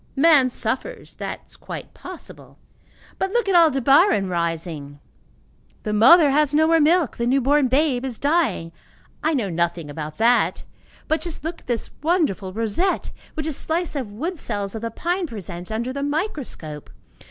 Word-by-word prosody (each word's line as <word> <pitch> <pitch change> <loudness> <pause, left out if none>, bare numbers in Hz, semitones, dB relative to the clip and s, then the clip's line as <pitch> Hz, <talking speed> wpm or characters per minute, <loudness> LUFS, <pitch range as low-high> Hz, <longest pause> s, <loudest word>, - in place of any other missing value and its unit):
Man 285 -3 +5
suffers, 255 - -4
that - - -5
is - - -11
quite - - -8
possible; - - -11 0.6
but 385 - 0
look 475 -4 +1
at 390 - +2
Aldebaran 275 - +4
rising! 165 -4 -3 0.8
The 210 - -2
mother 280 +8 +7
has 295 0 +2
no 315 +1 +5
more 330 0 +4
milk, 320 - +3
the 235 - -1
new 265 +3 +3
born 280 +1 +3
babe 265 -1 +1
is 255 -4 -3
dying. 280 - 0 0.5
I 315 0 +2
know 210 -8 -1
nothing 170 -2 -1
about 150 +1 -6
that, 235 +2 +2 0.4
but 315 - +1
just 340 -4 -4
look 330 +2 -5
at - - -27
this 240 -3 -2
wonderful 300 - 0
rosette 230 - -1 0.2
which 310 - -3
a 315 - -1
slice 325 +3 -2
of 255 -7 -4
wood 320 - -4
cells 200 -1 -3
of 220 - -5
the 230 - -3
pine 345 - -2
presents 185 - -8
under 235 +4 -3
the 280 - -4
microscope! 285 - -4
265 Hz, 165 wpm, -22 LUFS, 205-320 Hz, 0.8 s, mother